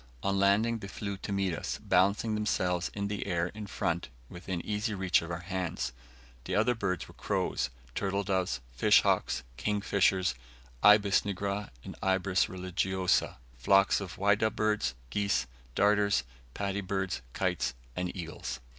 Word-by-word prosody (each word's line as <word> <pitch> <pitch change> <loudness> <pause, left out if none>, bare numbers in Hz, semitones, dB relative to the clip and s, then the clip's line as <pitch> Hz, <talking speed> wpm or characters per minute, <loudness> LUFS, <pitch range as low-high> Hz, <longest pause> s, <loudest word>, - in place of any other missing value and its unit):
On 100 0 +1
landing, 105 +4 +3
they 100 - -7
flew 100 0 -4
to 100 - -6
meet 95 -2 0
us, 80 - -3
balancing 100 +4 +2
themselves 90 -4 0
in 100 0 -1
the 100 -1 -3
air 85 -2 0
in 105 +1 -8
front, 85 -5 -2 0.2
within 90 0 -5
easy 105 +1 -1
reach 95 -2 +2
of 85 - -7
our 85 0 -4
hands. 90 -7 -3 0.5
The - - -2
other 110 +4 +3
birds 95 -6 -2
were - - -14
crows, - - -1 0.2
turtle 100 +4 -1
doves, 95 -9 0
fish - - +5
hawks, - - +1
kingfishers, 95 -3 +2 0.5
ibis 105 -1 +6
nigra 100 0 -3
and - - -8
ibis 95 0 +2
religiosa, 95 0 0 0.2
flocks 95 +9 +4
of 95 -3 -6
whydah 100 +2 +2
birds, 105 -8 +1 0.2
geese, 100 +6 +1 0.3
darters, 100 -8 +3 0.3
paddy 100 0 -1
birds, 95 -4 -2
kites, - - -1 0.2
and 90 0 -2
eagles. 80 -7 -5
100 Hz, 145 wpm, -30 LUFS, 90-100 Hz, 0.5 s, ibis